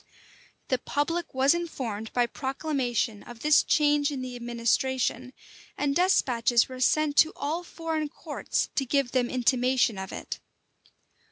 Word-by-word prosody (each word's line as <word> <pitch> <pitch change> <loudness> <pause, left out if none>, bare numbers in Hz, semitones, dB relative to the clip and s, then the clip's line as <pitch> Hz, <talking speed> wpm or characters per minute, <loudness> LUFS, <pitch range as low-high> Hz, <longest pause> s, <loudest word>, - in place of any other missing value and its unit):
[*] - - -30
The 255 - +1
public 330 +4 -2
was 270 +3 +4
informed 245 -11 -4
by 245 -1 +2
proclamation 260 -5 -2
of 240 -1 -12
this 300 0 +5
change 295 -2 +2
in 270 -3 -4
the 250 -1 -6
administration; 240 +1 -1 0.5
and 280 -1 0
despatches 245 -10 +3
were 255 -1 -9
sent 295 +3 +2
to 320 - +6
all 315 +5 -2
foreign 325 -3 -3
courts - - -3
to 275 - 0
give 270 -1 0
them 250 -2 +1
intimation 250 -3 +2
of 190 - -6
it. - - -6
260 Hz, 145 wpm, -27 LUFS, 240-295 Hz, 0.5 s, to